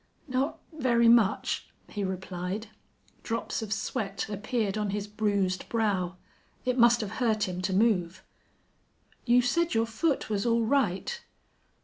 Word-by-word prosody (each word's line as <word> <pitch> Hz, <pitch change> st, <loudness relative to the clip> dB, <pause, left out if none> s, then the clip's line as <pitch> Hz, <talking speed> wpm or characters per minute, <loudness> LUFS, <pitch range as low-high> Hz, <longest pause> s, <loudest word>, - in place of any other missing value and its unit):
"Not 270 Hz, +4 st, -1 dB, 0.2 s
very 240 Hz, -6 st, +3 dB
much," 230 Hz, -4 st, +3 dB, 0.2 s
he 205 Hz, -, -4 dB
replied. 190 Hz, +2 st, -4 dB, 0.6 s
Drops 230 Hz, +1 st, -3 dB
of 215 Hz, -2 st, -6 dB
sweat 210 Hz, -2 st, -2 dB
appeared 215 Hz, 0 st, -1 dB
on 210 Hz, -1 st, -1 dB
his 205 Hz, 0 st, -2 dB
bruised 205 Hz, -3 st, -1 dB
brow. 195 Hz, -6 st, 0 dB, 0.5 s
It 250 Hz, 0 st, 0 dB
must 235 Hz, 0 st, +6 dB
have 210 Hz, -, -4 dB
hurt 220 Hz, -4 st, +2 dB
him 180 Hz, 0 st, -4 dB
to 185 Hz, -, -1 dB
move. 190 Hz, -3 st, +1 dB, 1.0 s
"You 245 Hz, +1 st, +5 dB
said 335 Hz, +4 st, +1 dB
your 225 Hz, 0 st, +3 dB
foot 275 Hz, +7 st, 0 dB
was 205 Hz, -2 st, -1 dB
all 230 Hz, -1 st, +2 dB
right." 275 Hz, -, 0 dB
215 Hz, 135 wpm, -28 LUFS, 195-235 Hz, 1.0 s, must